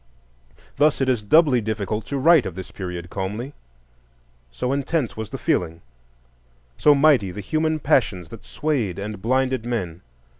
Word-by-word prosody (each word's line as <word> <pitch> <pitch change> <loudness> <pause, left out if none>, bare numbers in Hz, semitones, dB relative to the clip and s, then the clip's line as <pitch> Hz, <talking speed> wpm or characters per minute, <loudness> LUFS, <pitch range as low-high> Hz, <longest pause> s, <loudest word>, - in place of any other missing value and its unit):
Thus 150 +1 +3
it 135 - +1
is 125 -4 +1
doubly 135 +3 +4
difficult 105 0 -3
to 140 - -3
write 155 -1 +5
of 90 - -7
this 95 -1 -8
period 90 -2 -6
calmly, 105 +8 -4 1.0
so 70 - -2
intense 140 -1 -1
was 110 -1 -6
the - - -5
feeling, 85 -2 -1 0.9
so 145 - +5
mighty 140 -9 +4
the 90 - -7
human 155 +9 0
passions 100 - +1
that 115 - -11
swayed 120 - -2
and 105 0 -6
blinded 130 +1 0
men. 95 -9 -4
115 Hz, 150 wpm, -22 LUFS, 95-140 Hz, 1.0 s, write